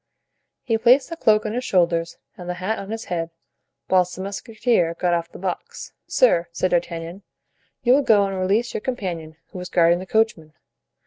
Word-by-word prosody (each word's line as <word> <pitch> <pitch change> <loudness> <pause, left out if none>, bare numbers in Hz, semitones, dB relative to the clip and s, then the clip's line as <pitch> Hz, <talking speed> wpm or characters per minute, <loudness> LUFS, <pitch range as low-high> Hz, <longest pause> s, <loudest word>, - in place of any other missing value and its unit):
He 225 -3 0
placed 250 +7 +4
the - - -3
cloak 215 -9 +3
on 215 - -2
his 250 +2 -2
shoulders 170 -5 +1 0.2
and 180 -1 -9
the 180 - -2
hat 190 +5 -2
on 195 - -8
his 225 +1 -5
head, 165 -2 -3 0.6
whilst 180 -1 +2
the 185 - -6
musketeer 200 -3 -1
got 175 0 0
off 170 0 -2
the - - -10
box. 185 -1 -5
"Sir," 170 - +3
said 185 +2 -1
D'Artagnan, 170 +1 -2 0.6
"you 245 - +5
will 280 - +5
go 210 -6 +4
and 195 0 -3
release 205 +6 0
your - - -3
companion, 175 -11 -4
who 185 - -8
is 180 0 -7
guarding 170 -1 +3
the 185 - -8
coachman. 220 -8 0
185 Hz, 190 wpm, -22 LUFS, 170-220 Hz, 0.6 s, you